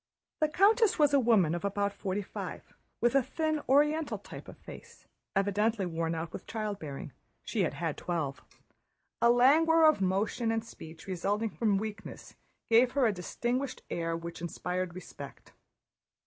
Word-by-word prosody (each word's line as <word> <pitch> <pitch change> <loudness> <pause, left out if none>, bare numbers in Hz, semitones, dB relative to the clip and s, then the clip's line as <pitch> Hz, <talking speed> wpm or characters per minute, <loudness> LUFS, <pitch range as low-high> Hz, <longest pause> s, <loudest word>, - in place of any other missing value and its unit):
The 310 - +3
countess 420 +6 +4
was 295 -2 +4
a 280 - +6
woman 220 -10 +3
of 175 - -3
about 200 0 -1
forty 200 0 -3
five, - - -7 0.3
with 240 +1 +3
a 275 - +5
thin 310 +3 -1
Oriental 295 +3 +3
type - - -11
of - - -11
face, - - -13 0.3
evidently 205 +1 +1
worn 165 -1 -2
out 160 0 -5
with - - -8
childbearing—she 195 - -6
had - - 0
had - - -3
twelve. 155 -6 -3 0.8
A 235 - +6
languor 315 +7 +5
of 310 -9 +5
motion 205 +5 0
and 225 0 -1
speech, 160 -7 -11
resulting 200 +4 -1
from 210 -4 +1
weakness, 215 +1 -7 0.3
gave 240 +2 +5
her 275 -2 +3
a 220 - +3
distinguished 240 - -3
air 165 -1 -1
which 170 0 -8
inspired 180 +1 -3
respect. 145 -6 -10
210 Hz, 150 wpm, -30 LUFS, 180-255 Hz, 0.8 s, a